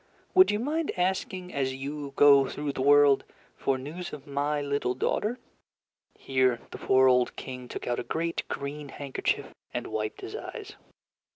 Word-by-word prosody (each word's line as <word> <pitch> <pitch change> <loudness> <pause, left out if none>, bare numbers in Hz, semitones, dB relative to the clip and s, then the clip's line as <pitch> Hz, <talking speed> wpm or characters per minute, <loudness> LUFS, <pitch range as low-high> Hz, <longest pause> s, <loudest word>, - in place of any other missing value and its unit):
Would 370 0 +7
you 205 - +2
mind 300 +7 -1
asking, 185 0 -1
as 130 -2 -1
you 140 +1 -5
go 140 -2 +7
through 145 +1 -3
the 135 - -4
world, 145 0 +6 0.3
for 135 - 0
news 155 +7 -6
of 145 -2 -8
my 145 +1 -1
little 140 -3 -1
daughter?" 210 - 0 0.8
(Here 130 -2 +2
the - - -8
poor 130 0 +4
old 125 -1 +3
King 125 -1 -7
took - - -6
out 120 - -1
a - - -3
great 165 +1 -2
green 145 +1 -5
handkerchief 140 -1 -2 0.2
and - - -2
wiped 110 0 -3
his - - -6
eyes.) - - -7
140 Hz, 165 wpm, -28 LUFS, 130-155 Hz, 0.8 s, Would